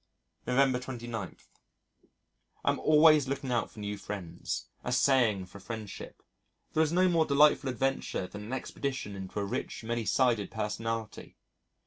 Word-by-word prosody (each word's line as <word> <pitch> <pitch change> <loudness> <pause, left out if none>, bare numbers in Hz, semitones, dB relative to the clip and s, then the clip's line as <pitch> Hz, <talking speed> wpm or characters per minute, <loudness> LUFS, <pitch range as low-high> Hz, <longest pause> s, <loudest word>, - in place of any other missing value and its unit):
November 130 0 +3
29.... 120 -6 -6 1.3
I - - +4
am - - -3
always 155 -2 +6
looking 135 -1 -3
out 120 - 0
for 110 - -13
new 105 0 -4
friends 95 -5 -5 0.2
assaying 125 -6 +3
for 100 - -12
friendship.... 110 0 -8 0.5
There 155 - +3
is 160 -1 +2
no 185 +2 +4
more 165 -3 +3
delightful 145 -1 +5
adventure 135 -6 -1
than 105 +3 -8
an 115 - -8
expedition 130 -4 -3
into 95 +1 -5
a 100 - -1
rich, 100 - -4
many 115 0 -2
sided 115 0 +2
personality. 110 +1 -4
120 Hz, 140 wpm, -30 LUFS, 105-135 Hz, 1.3 s, always